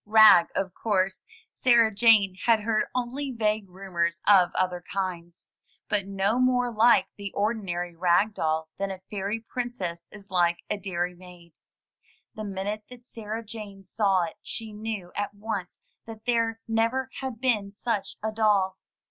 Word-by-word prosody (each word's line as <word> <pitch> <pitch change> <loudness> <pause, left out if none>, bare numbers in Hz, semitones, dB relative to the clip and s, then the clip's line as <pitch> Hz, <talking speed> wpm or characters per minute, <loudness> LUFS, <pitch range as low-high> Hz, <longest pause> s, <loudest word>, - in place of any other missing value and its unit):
Rag, 215 -5 +8
of 190 -2 -1
course 190 -3 0 0.2
— - - -34
Sarah 235 -3 +4
Jane 205 -3 +5
had 225 -2 +5
heard 215 0 +1
only 255 +3 -2
vague 215 -4 -1
rumors 175 -3 -2
of 190 -4 +7
other 180 -1 0
kinds 175 -3 -4 0.2
— - - -39
but 200 -2 +1
no 195 +4 0
more 250 -1 +2
like 230 +2 +5
the 200 -1 -6
ordinary 190 -5 -2
rag 180 +5 +3
doll 160 -3 -1
than 195 0 -1
a 190 -1 -6
fairy 205 +2 -2
princess 220 -9 -5
is 200 -2 -14
like 175 -2 +3
a 210 - +1
dairymaid. 180 -2 -5 0.8
The 215 - -6
minute 205 +1 -4
that 250 -1 -13
Sarah 225 -1 -6
Jane 205 -3 -9
saw 195 -1 +1
it 165 - -6
she 220 -2 -6
knew 210 -4 -5
at 205 0 -3
once 205 -3 -5 0.3
that 220 -1 -10
there 230 -2 +1
never 230 +4 0
had 260 -4 -5
been 225 -6 +1
such 205 0 -3
a 220 - -1
doll. 205 -4 +2
205 Hz, 155 wpm, -26 LUFS, 185-225 Hz, 0.8 s, Rag